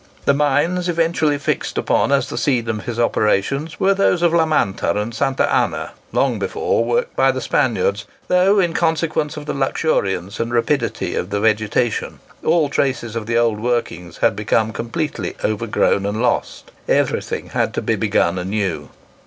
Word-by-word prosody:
The 140 Hz, -, +4 dB
mines 150 Hz, +6 st, +1 dB
eventually 165 Hz, -3 st, +1 dB
fixed 140 Hz, -, -2 dB
upon -, -, +1 dB
as 140 Hz, -1 st, +2 dB
the -, -, -6 dB
scene 125 Hz, -5 st, +1 dB
of 105 Hz, -2 st, -3 dB
his 120 Hz, -1 st, -4 dB
operations 130 Hz, +8 st, 0 dB
were 195 Hz, +1 st, +4 dB
those 190 Hz, -3 st, +2 dB
of 170 Hz, -1 st, +3 dB
La 165 Hz, -1 st, +3 dB
Manta 100 Hz, -8 st, 0 dB
and 110 Hz, +3 st, -3 dB
Santa 135 Hz, +3 st, +1 dB
Anna, -, -, 0 dB, 0.2 s
long -, -, +1 dB
before 455 Hz, +2 st, 0 dB
worked 480 Hz, +1 st, -1 dB
by -, -, +4 dB
the -, -, -4 dB
Spaniards, 480 Hz, +1 st, 0 dB, 0.2 s
though, 190 Hz, +3 st, +4 dB
in 175 Hz, -3 st, +1 dB
consequence 160 Hz, -2 st, 0 dB
of 150 Hz, -, -7 dB
the -, -, -3 dB
luxuriance 100 Hz, -, -1 dB
and 115 Hz, +1 st, -2 dB
rapidity 120 Hz, +4 st, 0 dB
of 90 Hz, -, -3 dB
the 100 Hz, 0 st, -1 dB
vegetation, 110 Hz, +2 st, 0 dB, 0.2 s
all 160 Hz, -2 st, +3 dB
traces 125 Hz, -5 st, -1 dB
of 110 Hz, -2 st, -4 dB
the 115 Hz, 0 st, +1 dB
old 115 Hz, -3 st, +2 dB
workings 110 Hz, -7 st, -2 dB
had -, -, +2 dB
become 110 Hz, +1 st, 0 dB
completely 115 Hz, -, -3 dB
overgrown 105 Hz, -2 st, +1 dB
and 105 Hz, +2 st, -2 dB
lost. 120 Hz, 0 st, -1 dB, 0.2 s
Everything -, -, 0 dB
had -, -, 0 dB
to -, -, -1 dB
be -, -, +1 dB
begun 85 Hz, +2 st, +1 dB
anew. 95 Hz, -1 st, -2 dB
130 Hz, 170 wpm, -19 LUFS, 110-160 Hz, 0.2 s, The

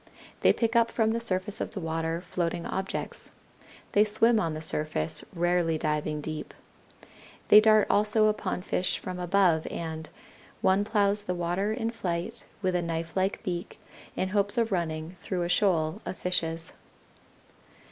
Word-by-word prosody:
They -, -, +5 dB
pick 230 Hz, 0 st, 0 dB
up 230 Hz, 0 st, +4 dB
from 220 Hz, -1 st, +1 dB
the 230 Hz, -, 0 dB
surface 200 Hz, -2 st, -1 dB
of -, -, -4 dB
the -, -, -2 dB
water 165 Hz, 0 st, -2 dB
floating 175 Hz, -1 st, -2 dB
objects. 190 Hz, 0 st, -4 dB, 0.6 s
They 205 Hz, -, +5 dB
swim 220 Hz, +2 st, +3 dB
on 165 Hz, -5 st, -1 dB
the -, -, -4 dB
surface, 150 Hz, -, -1 dB
rarely 175 Hz, -2 st, +1 dB
diving 150 Hz, -1 st, -1 dB
deep. 155 Hz, 0 st, -6 dB, 0.9 s
They 210 Hz, -, +10 dB
dart 215 Hz, -1 st, +5 dB
also 215 Hz, +1 st, +3 dB
upon 210 Hz, -4 st, -1 dB
fish 185 Hz, -, 0 dB
from 185 Hz, -1 st, -6 dB
above, 180 Hz, -3 st, +2 dB
and 160 Hz, -1 st, -5 dB, 0.5 s
"one 190 Hz, +1 st, +3 dB
plows 205 Hz, -1 st, +2 dB
the 180 Hz, -, -2 dB
water 175 Hz, +4 st, -1 dB
in 225 Hz, 0 st, -2 dB
flight 185 Hz, +1 st, -4 dB, 0.2 s
with 185 Hz, -1 st, +1 dB
a 175 Hz, -, +2 dB
knifelike 170 Hz, +5 st, -2 dB
beak 180 Hz, -1 st, -4 dB, 0.4 s
in 190 Hz, -, -1 dB
hopes 205 Hz, +3 st, +2 dB
of 230 Hz, -1 st, +1 dB
running 165 Hz, -1 st, -2 dB
through 180 Hz, -2 st, -2 dB
a 175 Hz, -, -2 dB
shoal 175 Hz, -4 st, +2 dB
of -, -, -5 dB
fishes." 165 Hz, -2 st, -2 dB
180 Hz, 155 wpm, -28 LUFS, 165-210 Hz, 0.9 s, They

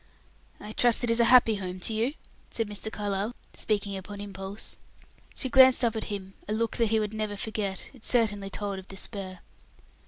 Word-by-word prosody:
"I 210 Hz, -, -8 dB
trust 240 Hz, +2 st, +3 dB
it 235 Hz, -, +2 dB
is 230 Hz, -, +3 dB
a 235 Hz, -, +6 dB
happy 230 Hz, -3 st, +6 dB
home 185 Hz, -1 st, -5 dB
to 220 Hz, -, 0 dB
you?" 235 Hz, +7 st, 0 dB, 0.3 s
said 225 Hz, -2 st, -1 dB
Mr. 210 Hz, +1 st, -3 dB
Carlyle, 205 Hz, +2 st, -2 dB, 0.2 s
speaking 205 Hz, -2 st, -1 dB
upon 200 Hz, +2 st, -7 dB
impulse. 195 Hz, 0 st, -6 dB, 0.6 s
She 265 Hz, -, -2 dB
glanced 260 Hz, -1 st, +7 dB
up 230 Hz, -1 st, +1 dB
at 220 Hz, -, -2 dB
him 195 Hz, -2 st, -5 dB
a 210 Hz, -, -1 dB
look 225 Hz, +1 st, 0 dB
that 230 Hz, -2 st, +3 dB
he 220 Hz, 0 st, +3 dB
would 210 Hz, 0 st, -2 dB
never 215 Hz, -1 st, -2 dB
forget; 205 Hz, -2 st, -3 dB
it 250 Hz, -4 st, -17 dB
certainly 210 Hz, -5 st, +1 dB
told 200 Hz, -1 st, -3 dB
of 190 Hz, -, -12 dB
despair. 195 Hz, -1 st, -5 dB
210 Hz, 190 wpm, -28 LUFS, 200-230 Hz, 0.6 s, glanced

